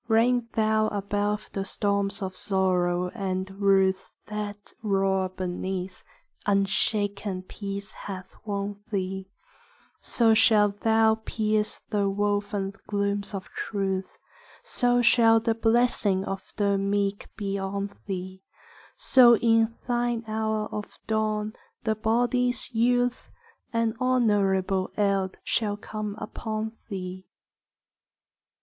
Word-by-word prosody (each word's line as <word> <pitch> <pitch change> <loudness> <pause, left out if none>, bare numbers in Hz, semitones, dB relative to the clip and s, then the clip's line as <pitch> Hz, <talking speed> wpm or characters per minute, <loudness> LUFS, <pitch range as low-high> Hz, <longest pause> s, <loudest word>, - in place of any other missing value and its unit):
Reign 235 +1 +3
thou 215 0 +2
above 205 0 -1
the 195 - -1
storms 200 0 -1
of 185 -1 -4
sorrow 180 -2 +1
and 190 -2 -3
ruth 190 -1 +3 0.2
That 210 -1 -6
roar 195 -2 +1
beneath; 185 0 -4 0.4
unshaken 200 -1 0
peace 200 +1 -6
hath 190 -2 -8
won 200 -1 -3
thee: 190 -1 -3 0.7
So 230 -2 +3
shall 215 -2 +5
thou 220 +2 +2
pierce 215 -1 -1
the 200 -2 +2
woven 205 -1 -1
glooms 200 0 -1
of 190 - -5
truth; 195 -2 -3 0.5
So 245 0 +2
shall 225 -1 +6
the 225 0 +1
blessing 225 -4 +2
of 195 0 -5
the 200 -2 +2
meek 200 0 0
be 200 -1 -2
on 200 +1 -3
thee; 190 -1 -5 0.6
So 240 -3 +7
in 225 0 +3
thine 240 -1 0
hour 220 0 -1
of 210 -1 -6
dawn, 215 -1 0 0.3
the 220 -2 +2
body's 240 +3 0
youth, 245 +2 +1 0.4
An 230 -1 +1
honourable 200 -7 +2
eld 195 -2 +1
shall 205 -2 0
come 210 -1 -5
upon 220 0 -4 0.2
thee. 185 -2 -6
205 Hz, 110 wpm, -27 LUFS, 195-220 Hz, 0.7 s, So